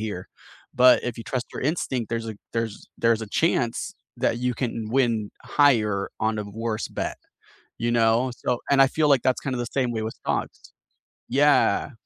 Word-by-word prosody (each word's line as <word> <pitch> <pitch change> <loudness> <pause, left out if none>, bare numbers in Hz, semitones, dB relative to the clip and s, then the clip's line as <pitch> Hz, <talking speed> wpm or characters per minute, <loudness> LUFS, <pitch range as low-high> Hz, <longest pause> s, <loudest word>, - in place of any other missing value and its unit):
here. 105 -4 -5 0.4
But 125 0 +6
if 125 -2 -4
you 115 - -7
trust 125 +1 -3
your - - -5
instinct, 130 -6 -1
there's 115 -1 -2
a 110 - -6 0.2
there's 115 -2 -3
there's 115 -1 +2
a - - -5
chance 120 0 0 0.2
that 115 - 0
you 125 0 -1
can 115 -3 -3
win 115 -4 +1
higher 110 -9 +2
on 110 0 0
a - - -1
n 100 0 -10
worse 110 0 -3
bet, - - -4 0.6
you 120 0 -1
know? 115 +2 +3
So 125 - 0
and 135 -1 +6
I 135 - +7
feel 150 +3 +1
like 140 -4 +4
that's 130 -1 +1
kinda 130 -3 -3
the 120 - -2
same 130 -3 0
way 110 -2 -2
with 110 +1 -4
dogs. - - -3 0.6
Yeah. 145 +2 +3
115 Hz, 190 wpm, -25 LUFS, 110-130 Hz, 0.6 s, I